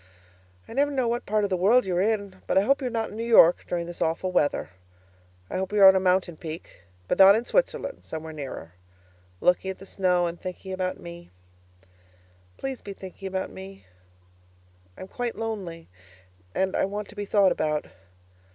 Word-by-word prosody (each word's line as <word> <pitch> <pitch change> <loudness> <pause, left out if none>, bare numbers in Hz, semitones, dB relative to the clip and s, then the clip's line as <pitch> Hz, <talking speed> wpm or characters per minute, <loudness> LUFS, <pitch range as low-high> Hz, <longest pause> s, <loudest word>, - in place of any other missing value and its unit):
I - - -9
never 285 +3 +2
know 260 -4 0
what 235 +1 -2
part 215 0 +1
of 200 - -1
the - - +3
world 215 +8 +4
you 185 -2 -1
are 180 - +2
in, 200 -3 -1
but - - +1
I - - +7
hope 275 +8 +2
you're 255 - -1
not 225 -2 -2
in - - -9
New 230 - -3
York 220 -7 +6
during 170 -1 -2
this 175 0 -9
awful 165 +3 0
weather. 150 - 0 0.8
I - - -4
hope 190 +1 -3
you're 205 -2 +7
on 190 - +8
a - - +4
mountain 180 -2 +1
peak 160 - -9 0.3
(but - - -1
not 195 +1 +9
in 230 +2 -1
Switzerland; - - -1
somewhere 160 0 -7
nearer) 135 - -7 0.7
looking 180 +1 +2
at 190 - -5
the 195 - -12
snow 180 -2 +1
and 170 0 -5
thinking 185 +1 -6
about 185 -1 -2
me. 170 0 -10 1.3
Please 270 -2 -5
be 200 - -7
thinking 190 0 -9
about 190 0 -3
me. 195 +1 -11 1.1
I'm 185 - -8
quite 245 +3 -4
lonely 195 -7 -5 0.7
and 190 0 0
I - - +2
want 205 +1 -5
to 210 - -14
be 205 -1 -4
thought 200 -2 +4
about. 150 -1 -1
190 Hz, 190 wpm, -26 LUFS, 175-215 Hz, 1.3 s, not